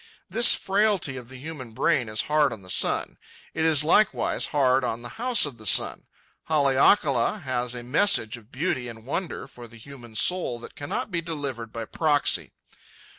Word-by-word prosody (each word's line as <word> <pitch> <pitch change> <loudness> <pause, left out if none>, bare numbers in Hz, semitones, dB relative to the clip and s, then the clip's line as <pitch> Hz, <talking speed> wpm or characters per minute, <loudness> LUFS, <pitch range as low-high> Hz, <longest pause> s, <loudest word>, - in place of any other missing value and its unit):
This 235 +1 +5
frailty 195 -7 +1
of 125 -2 -9
the 130 - -10
human 130 -4 -8
brain 115 +1 +1
is 110 0 +1
hard 150 -2 +2
on 110 -4 -8
the 90 - -3
sun. - - 0 0.3
It - - -2
is 155 -3 +4
likewise 210 +7 +2
hard 135 -3 +2
on 120 -1 -3
the 120 - -8
House 250 -6 +3
of 135 -5 -8
the 110 - -9
Sun. - - +2 0.4
Haleakala 140 - +2
has 125 -1 -2
a 120 - -6
message 125 - +2
of 120 0 -16
beauty 130 -4 -2
and 115 -1 -10
wonder 170 +7 -4
for 120 -1 -11
the 115 +1 -15
human 120 -2 -13
soul 125 - +1
that - - -10
cannot 145 +7 -4
be 170 -2 -1
delivered 140 -9 -5
by 115 -1 -5
proxy. 150 +3 +1
135 Hz, 180 wpm, -25 LUFS, 120-160 Hz, 0.4 s, This